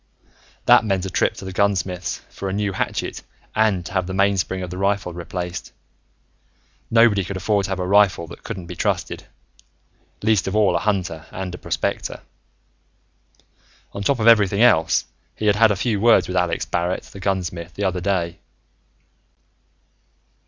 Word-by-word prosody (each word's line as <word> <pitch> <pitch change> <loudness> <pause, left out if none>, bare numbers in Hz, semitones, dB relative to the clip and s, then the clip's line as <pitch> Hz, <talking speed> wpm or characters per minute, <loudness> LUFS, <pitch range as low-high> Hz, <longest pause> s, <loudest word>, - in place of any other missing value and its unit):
That - - +7
meant 95 -3 -1
a 95 - -5
trip - - +1
to - - -9
the 95 - -5
gunsmith's, 95 -2 -1
for 100 - -5
a - - -3
new 100 -1 -1
hatchet - - -3 0.3
and 105 -5 +1
to - - -7
have 95 -2 0
the 95 - -4
mainspring 95 -1 +1
of 90 - -6
the 90 - -6
rifle 100 -2 0
replaced. 90 +1 -5 1.2
Nobody 115 -4 +4
could 95 +2 -5
afford 100 +2 +1
to - - -5
have 95 - -2
a 90 - -1
rifle 100 -3 +3
that - - -12
couldn't 95 -2 -6
be 90 +1 -8
trusted, - - -2 1.0
least 110 -3 +2
of 95 - -2
all 100 -5 +3
a - - +2
hunter 90 -6 -2
and 90 -1 -6
prospector. - - -3 1.7
On 100 - -6
top 125 +5 +1
of 110 - 0
everything 105 -2 +5
else, 80 -10 +4 0.3
he 110 - -4
had 105 -1 +3
had 115 0 +6
a 105 - +1
few 105 +1 -1
words 115 0 +5
with 90 - -4
Alex 90 -2 0
Barrett, 85 +1 -1
the 100 - -12
gunsmith, 90 -3 -3
the 100 - -3
other 95 -2 0
day. 90 -3 -1
95 Hz, 165 wpm, -22 LUFS, 90-100 Hz, 1.7 s, That